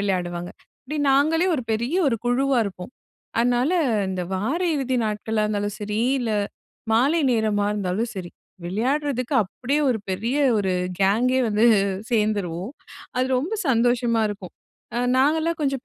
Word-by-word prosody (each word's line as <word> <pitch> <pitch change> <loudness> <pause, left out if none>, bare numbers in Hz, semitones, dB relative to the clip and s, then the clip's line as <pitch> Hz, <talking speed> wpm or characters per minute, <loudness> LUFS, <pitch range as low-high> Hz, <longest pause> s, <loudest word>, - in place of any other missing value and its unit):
விளையாடுவாங்க. 175 -3 -2 0.3
இப்படி 300 +3 -5
நாங்களே 315 +6 +3
ஒரு 270 - -2
பெரிய 235 +8 -1
ஒரு 235 - 0
குழுவா 260 +2 +2
இருப்போம். 185 0 -7 0.5
அதனால 245 +5 +2 0.4
இந்த 185 -1 -2
வார 255 - -1
இறுதி 260 -2 -1
நாட்களா 215 0 -1
இருந்தாலும் 205 -1 -2
சரி, 210 +1 -2 0.2
இல்ல 240 -3 -2 0.6
மாலை 280 +9 +3
நேரமா 215 -3 +1
இருந்தாலும் 210 +3 -2
சரி, 180 -2 -6 0.3
விளையாட்றதுக்கு 255 +7 -1
அப்படியே 260 +9 -2
ஒரு 240 - +1
பெரிய 225 +8 -1 0.2
ஒரு 190 -2 0 0.3
கேங்கே 240 +7 +3
வந்து 215 +1 +2 0.5
சேர்ந்துருவோம் 210 -3 -1 0.4
அது 255 +1 +2
ரொம்ப 335 - -2
சந்தோஷமா 240 -1 +2
இருக்கும். 200 -3 -7 0.4
அ - - +1 0.2
நாங்கலாம் 315 +5 +2
கொஞ்சம் 275 -1 -1
230 Hz, 135 wpm, -23 LUFS, 205-265 Hz, 0.6 s, நாங்களே